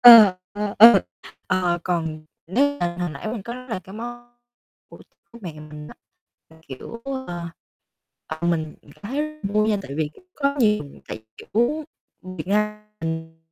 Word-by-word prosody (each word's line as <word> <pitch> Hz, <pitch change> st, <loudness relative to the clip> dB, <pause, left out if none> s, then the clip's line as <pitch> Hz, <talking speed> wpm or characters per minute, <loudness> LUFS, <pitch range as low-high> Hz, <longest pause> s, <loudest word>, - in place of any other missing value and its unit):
Ờ, 225 Hz, -6 st, +11 dB, 0.2 s
ờ, 205 Hz, 0 st, -2 dB
ờ. 230 Hz, +2 st, +10 dB, 0.4 s
Ờ, 180 Hz, -2 st, +2 dB
còn 160 Hz, -3 st, -1 dB, 0.2 s
nếu 280 Hz, +10 st, +2 dB
mà 175 Hz, 0 st, 0 dB
hồi 175 Hz, -2 st, 0 dB
nãy 140 Hz, +9 st, -5 dB
mình 220 Hz, -3 st, -3 dB
có 235 Hz, -, -5 dB
là 255 Hz, -5 st, -4 dB
cái 190 Hz, -, -11 dB
món 240 Hz, +2 st, -7 dB, 0.6 s
của -, -, -13 dB, 0.3 s
của 235 Hz, -, -11 dB
mẹ 175 Hz, -, -5 dB
mình 150 Hz, 0 st, -9 dB
á, -, -, -11 dB, 0.6 s
là 160 Hz, -, -17 dB
kiểu, 230 Hz, -, -8 dB
ờ, 260 Hz, -11 st, -4 dB, 0.8 s
ờ, 160 Hz, +2 st, -2 dB
mình 160 Hz, -3 st, 0 dB
cảm -, -, -17 dB
thấy 265 Hz, +8 st, -1 dB
rất 305 Hz, 0 st, -4 dB, 0.2 s
vui 215 Hz, +1 st, +4 dB
nha 210 Hz, -, +3 dB
tại 140 Hz, -, -9 dB
vì 155 Hz, -2 st, +1 dB, 0.3 s
có 280 Hz, -1 st, +1 dB
nhiều 210 Hz, -, +4 dB, 0.2 s
tại, -, -, -5 dB, 0.2 s
kiểu, 250 Hz, +8 st, 0 dB, 0.5 s
Việt 155 Hz, -, -5 dB
Nam 210 Hz, +1 st, +1 dB, 0.2 s
mình 160 Hz, 0 st, -4 dB
205 Hz, 170 wpm, -24 LUFS, 165-235 Hz, 0.8 s, Ờ